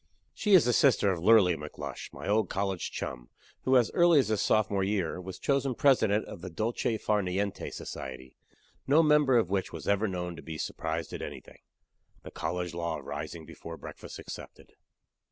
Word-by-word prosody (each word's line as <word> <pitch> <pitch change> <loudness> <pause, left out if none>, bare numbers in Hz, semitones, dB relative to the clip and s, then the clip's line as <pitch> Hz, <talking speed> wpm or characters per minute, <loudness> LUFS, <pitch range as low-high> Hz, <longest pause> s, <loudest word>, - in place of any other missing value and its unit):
She 210 -2 +4
is 175 - +6
the 120 - +2
sister 120 -8 +4
of 90 - -2
Lurly 100 -5 +6
McLush, 75 -1 -7
my - - -8
old 105 -1 +2
college 95 -2 -2
chum, 60 -2 -6 0.4
who, 130 0 +5
as 120 -3 +3
early 170 -2 +5
as 135 - +3
his 110 -2 +1
sophomore 105 -3 +2
year, 95 -3 -1
was 95 0 -7
chosen 135 -2 0
president 110 -7 +3
of - - -9
the 90 - -6
Dolce 110 +5 -1
far 105 -1 +1
niente 95 +2 -2
Society 65 -1 -8 0.5
no 150 +4 +5
member 150 -4 +4
of 95 -6 +1
which 95 -1 -1
was - - -8
ever 100 +2 +2
known 90 -2 -4
to 80 - -9
be 80 -1 -7
surprised - - -4
at - - -5
anything - - -9 0.6
(the - - -9
college 90 -2 -3
law 85 -1 -2
of - - -11
rising 80 -2 -6
before 85 +1 -9
breakfast - - -9
excepted). - - -10
100 Hz, 185 wpm, -29 LUFS, 90-120 Hz, 0.6 s, is